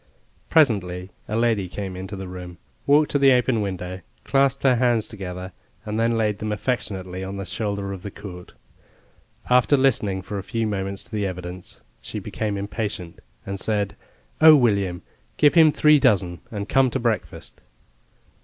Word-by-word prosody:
Presently 95 - +2 0.2
a 110 - -2
lady 115 -5 +1
came 95 0 -5
into 95 +2 -6
the 95 -1 -6
room, 90 -1 -8 0.3
walked 145 +2 +4
to 145 - +2
the 135 -1 +6
open 125 -2 +2
window, 95 -2 -4 0.2
clasped 135 0 +2
her 130 -3 +4
hands 120 -3 +2
together, 95 -4 -7 0.3
and 105 - -4 0.2
laid 105 -2 0
them 105 0 -3
affectionately 95 -5 -3
on 95 +1 -5
the 100 - -5
shoulder 100 -3 -3
of 95 - -8
the 100 - -6
court. 95 -3 -10 0.9
After 125 +3 +4
listening 105 -8 +1
for 100 +2 -5
a - - -6
few 115 +4 -2
moments 100 -2 -3
to 120 - -19
the 105 -3 -1
evidence 90 0 -8 0.2
she - - -7
became 105 -2 -3
impatient, 100 -3 -5 0.3
and 100 0 -5
said, 105 -1 -1 0.5
"Oh, 160 0 +10
William, 100 -8 +1 0.3
give 145 -1 +5
him 160 -2 +7
three 150 0 +5
dozen 95 -10 +2
and 100 -2 -5
come 135 -1 +3
to - - -2
breakfast." 115 -2 -3
100 Hz, 165 wpm, -23 LUFS, 95-120 Hz, 0.9 s, Oh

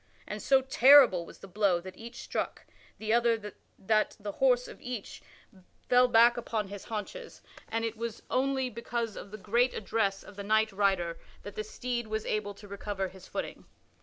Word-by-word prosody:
And - - -5
so 270 -1 +4
terrible 260 -9 +6
was - - -12
the - - -12
blow 195 -2 +2
that 185 +1 -10
each 235 +1 -9
struck - - -4 0.3
the 220 0 -1
other 230 -3 +1 0.2
that 215 +2 +1
the 205 0 -5
horse 250 +1 +2
of - - -12
each 245 -5 -6 0.7
fell 250 0 +6
back 235 0 +6
upon 220 -4 -3
his 200 -1 -8
haunches, 460 - -6 0.3
and 225 0 -1
it 225 0 -3
was 230 -1 -5
only 265 0 +1
because 235 -2 -4
of - - -8
the 215 - -8
great 235 +6 +1
address 200 -2 -1
of 205 - -14
the 200 - -5
knight 220 +1 +2
rider 190 -4 0 0.2
that 205 - -8
the 215 - -3
steed 240 +2 -4
was 220 0 -3
able 205 -1 -2
to 205 +1 -13
recover 200 -1 -4
his 190 0 -14
footing. - - -5
220 Hz, 185 wpm, -30 LUFS, 200-240 Hz, 0.7 s, terrible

